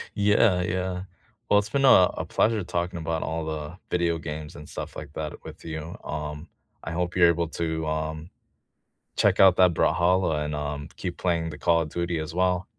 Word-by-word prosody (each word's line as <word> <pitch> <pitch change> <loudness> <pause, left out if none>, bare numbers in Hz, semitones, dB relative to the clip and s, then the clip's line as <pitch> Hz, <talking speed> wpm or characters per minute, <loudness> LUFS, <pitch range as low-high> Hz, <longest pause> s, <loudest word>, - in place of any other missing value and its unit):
Yeah, 100 -2 +3
yeah. 90 0 -2 0.5
Well, 105 - +5
it's 105 +1 -4
been 135 +2 +2
a 90 -8 +7
a - - -3
pleasure 110 -1 +1
talking 85 0 -3
about 80 0 -2
all 80 0 -3
the 80 +2 -5
video 85 -1 +1
games 75 -1 -7
and 75 - -10
stuff - - -7
like 75 -1 -8
that 75 -1 -4
with - - -10
you. 80 +1 -6
Um, 75 +1 -5 0.3
I 80 - -5
hope 90 +1 -2
you're 85 -2 +6
able 85 0 +1
to, 80 -2 -2
um, 80 +2 -3 0.9
check - - +4
out 95 -2 +7
that 90 -2 +5
Brawlhalla 85 -2 +2
and, 75 0 -3
um, 75 0 -4
keep 90 -2 -5
playing 85 -2 0
the 75 - -8
Call 85 -1 +3
of 75 - -4
Duty 85 0 -2
as 80 +1 -5
well. 90 0 +1
85 Hz, 190 wpm, -26 LUFS, 80-90 Hz, 0.9 s, a